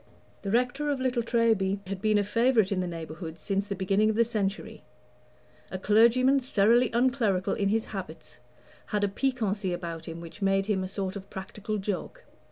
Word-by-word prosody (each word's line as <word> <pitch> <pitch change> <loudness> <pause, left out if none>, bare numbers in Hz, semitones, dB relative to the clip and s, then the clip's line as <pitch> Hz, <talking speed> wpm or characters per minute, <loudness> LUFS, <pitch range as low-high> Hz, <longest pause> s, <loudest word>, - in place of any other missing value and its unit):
The 200 - -4
rector 250 +6 +1
of 280 -2 0
Little 255 -2 0
Treby 225 -4 +1
had 195 0 -5
been 215 -1 +3
a 205 - +2
favorite 230 0 +2
in 195 - 0
the 180 - -2
neighborhood 160 -1 -7
since 195 +5 -2
the 200 - -3
beginning 195 +3 +2
of 220 - 0
the 230 +1 +4
century. 210 -3 -3 0.9
A 185 - -4
clergyman 235 +7 +4
thoroughly 240 -1 +3
unclerical 230 -6 +1
in 200 -1 0
his 220 +2 +1
habits 180 -9 -8 0.5
had 210 -1 -1
a - - +3
piquancy 205 -4 -1
about 165 -2 -6
him 165 0 -6
which 170 +4 -11
made 195 0 +2
him 195 -3 0
a - - -3
sort 190 0 -4
of 200 0 -8
practical 205 +2 -5
joke. 205 - -4
205 Hz, 180 wpm, -28 LUFS, 190-230 Hz, 0.9 s, the